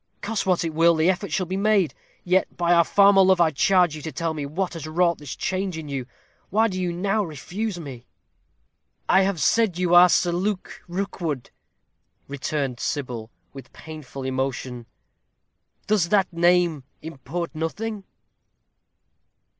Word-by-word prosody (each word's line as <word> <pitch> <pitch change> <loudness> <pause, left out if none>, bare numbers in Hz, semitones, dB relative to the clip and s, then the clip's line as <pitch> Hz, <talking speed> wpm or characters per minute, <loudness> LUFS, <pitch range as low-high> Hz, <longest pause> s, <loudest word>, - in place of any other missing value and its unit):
Cost 210 -2 -3
what 180 -2 +2
it 165 - -3
will, 165 +1 +4
the 160 +3 +3
effort 190 -1 -5
shall 185 +4 0
be 185 +2 -4
made. 200 -4 +2 0.3
Yet 185 +1 0
by 175 0 +2
our 170 -1 +6
former 200 +2 +5
love, 190 -1 +4
I 165 -2 +4
charge 175 +2 +3
you 155 - -8
tell 160 +1 -3
me 150 -2 -4
what 180 +5 -3
has 160 -2 -7
wrought 170 +1 +1
this 145 -3 -7
change 185 -2 -2
in 155 -2 -7
you! 135 -3 -4 0.4
Why 220 +4 +3
do 185 -1 -4
you 180 -1 -1
now 195 +5 0
refuse 180 +5 -5
me?" 130 -7 -9 1.0
"I 190 - +5
have 195 -3 0
said 205 +4 +2
you 180 -1 0
are 175 +1 +8
Sir 175 0 +2
Luke 185 +3 -3
Rookwood," 175 -7 -4 0.8
returned 140 -2 -3
Sybil, 125 -6 -4 0.2
with 135 -3 -11
painful 155 -4 -9
emotion. 130 -2 -3 1.0
"Does 205 -5 +1
that 195 -3 +2
name 175 -3 +2 0.2
import 160 +2 -5
nothing?" 200 +7 -4
170 Hz, 155 wpm, -24 LUFS, 150-190 Hz, 1.0 s, are